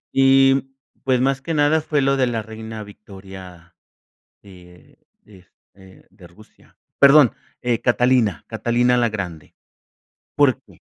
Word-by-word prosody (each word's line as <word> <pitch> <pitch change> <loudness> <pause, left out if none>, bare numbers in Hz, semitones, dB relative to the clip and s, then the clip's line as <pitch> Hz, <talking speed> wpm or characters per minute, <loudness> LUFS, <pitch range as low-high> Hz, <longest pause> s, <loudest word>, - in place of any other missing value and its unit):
Y 135 0 +3 0.3
pues, 130 -2 +1
más 135 0 0
que 165 +4 -5
nada, 150 +2 +2
fue 150 -1 -1
lo 135 0 +1
de 130 -1 +1
la 115 -2 -3
Reina 110 0 -9
Victoria, 95 -4 -14 0.7
de 90 -3 -18 0.3
de 100 -3 -18 0.3
este, 95 -1 -19
de 95 -2 -17
Rusia, 105 +6 -22 0.2
perdón, 140 -3 +6 0.3
eh, 120 -2 -1
Catalina, 120 -5 +1
Catalina 120 +2 0
la 120 -1 +1
Grande. 90 -7 -7 0.8
¿Por - - +2
qué? - - -22
115 Hz, 130 wpm, -20 LUFS, 95-135 Hz, 0.8 s, perdón